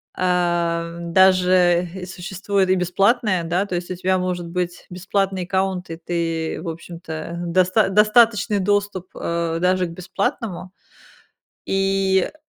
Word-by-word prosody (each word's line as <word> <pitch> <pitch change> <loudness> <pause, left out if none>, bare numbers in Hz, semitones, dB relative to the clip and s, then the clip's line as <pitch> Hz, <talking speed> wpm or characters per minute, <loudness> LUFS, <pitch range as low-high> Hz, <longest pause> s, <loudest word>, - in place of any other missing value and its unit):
А, 170 -2 0
даже 180 0 +3
и 185 -1 -6
существует 190 +1 -2
и 185 - +4
бесплатное, 190 +2 +1
да, 175 +4 0
то 200 - -7
есть 175 0 -4
у 185 - -3
тебя 185 +1 0
может 180 -1 -3
быть 175 0 -4
бесплатный 190 +1 -1
аккаунт, 190 0 -1
и 165 - -6
ты, 165 -1 -3
в 170 - -5
общем-то, 165 0 -7
доста 185 +4 +3
достаточный 210 0 +4
доступ, 200 -1 0
а, 170 -1 -2
даже 180 +1 +2
к - - -8
бесплатному. 185 - -4 0.9
И, 195 -1 +1
э, - - -22
180 Hz, 135 wpm, -21 LUFS, 170-195 Hz, 0.9 s, и